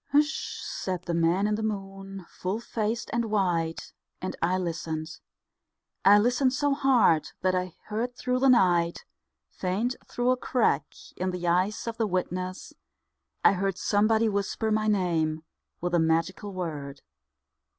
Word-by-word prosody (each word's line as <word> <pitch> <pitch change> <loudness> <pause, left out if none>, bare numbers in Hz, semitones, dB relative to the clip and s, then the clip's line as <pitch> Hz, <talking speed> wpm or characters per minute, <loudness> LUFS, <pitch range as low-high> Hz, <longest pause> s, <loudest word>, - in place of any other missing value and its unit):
"H'shh," 300 +1 +1
said 185 -2 -4
the 175 - -3
man 170 +4 +2
in 210 - +1
the 215 - -1
moon, 195 -3 -5
Full 190 +4 -3
faced 230 0 -3
and 235 0 +1
white, 175 -6 -1 0.3
And 185 - -4
I 180 +2 +2
listened, 165 -2 -4 0.8
I 200 +2 +8
listened 250 +4 +2
so 285 +1 +1
hard 255 - +3
that 185 0 +2
I 180 -1 -2
heard 235 +4 -3
through 250 0 -1
the 270 +1 +4
night, 175 -8 +3 0.5
Faint 205 +7 -1
through 245 +1 +1
a 255 - +2
crack 240 - +1 0.3
In 185 +1 -1
the 180 -1 -3
ice 185 +5 +1
of 230 -1 -4
the 225 - +1
whiteness, 185 0 -3 0.7
I - - +8
heard 195 0 -1
Somebody 220 +3 +2
whisper 210 +2 -1
my 215 0 +1
name 165 -6 +1 0.4
With 175 0 -2
a 175 - +4
magical 165 +5 0
word. 150 -7 -5
195 Hz, 150 wpm, -27 LUFS, 175-220 Hz, 0.8 s, I